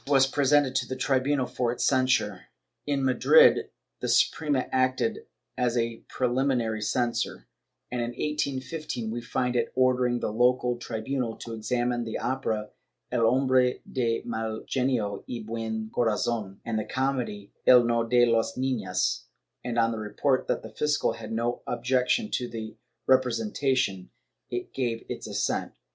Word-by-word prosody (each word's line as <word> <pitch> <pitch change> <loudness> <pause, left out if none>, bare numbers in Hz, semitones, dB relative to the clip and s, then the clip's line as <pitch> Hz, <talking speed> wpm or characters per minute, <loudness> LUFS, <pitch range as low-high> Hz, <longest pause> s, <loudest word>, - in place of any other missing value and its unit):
was 135 -2 +5
presented 140 0 +3
to 130 -2 0
the 130 - -4
tribunal 135 +1 +1
for 120 -1 -1
its 120 - -3
censure. 130 -7 +1 0.4
In 140 -2 0
Madrid, 475 - +5 0.3
the - - -3
Suprema 145 -4 +2
acted 130 -2 0 0.3
as 125 -1 0
a 115 -1 0
preliminary 125 -3 0
censor; 120 +2 -1 0.5
in 125 - -2
1815 130 0 -3
we 120 +1 -3
find 125 +1 -1
it 120 -1 0
ordering 125 -1 +2
the 105 - -2
local 125 +1 +2
tribunal 120 +1 -3
to 115 - -8
examine 120 +2 -1
the 110 -1 -4
opera 110 -5 -2 0.4
"El 115 -2 +3
hombre 130 0 +3
de 115 -3 -1
mal 110 -1 -3
genio 125 -6 0
y 120 -2 -4
buen 110 -1 -4
corazon," 110 -3 0
and 110 -2 -1
the - - -1
comedy 125 -4 -2
"El 125 -1 +8
no 115 0 +1
de 120 +1 +4
las 115 -1 +1
niiias" 115 -9 -1 0.4
and, 120 -1 -3
on 115 0 +3
the 115 - -4
report 130 +5 0
that - - -1
the - - -10
fiscal 150 -1 +1
had - - -8
no 120 +2 -1
objection 125 - +1
to 125 - -1
their 110 -2 -6 0.4
repre 130 -1 +4
sentation, 115 -4 0 0.4
it 120 0 -5
gave 120 -4 -2
its - - -5
assent. - - -1
120 Hz, 150 wpm, -27 LUFS, 115-130 Hz, 0.5 s, El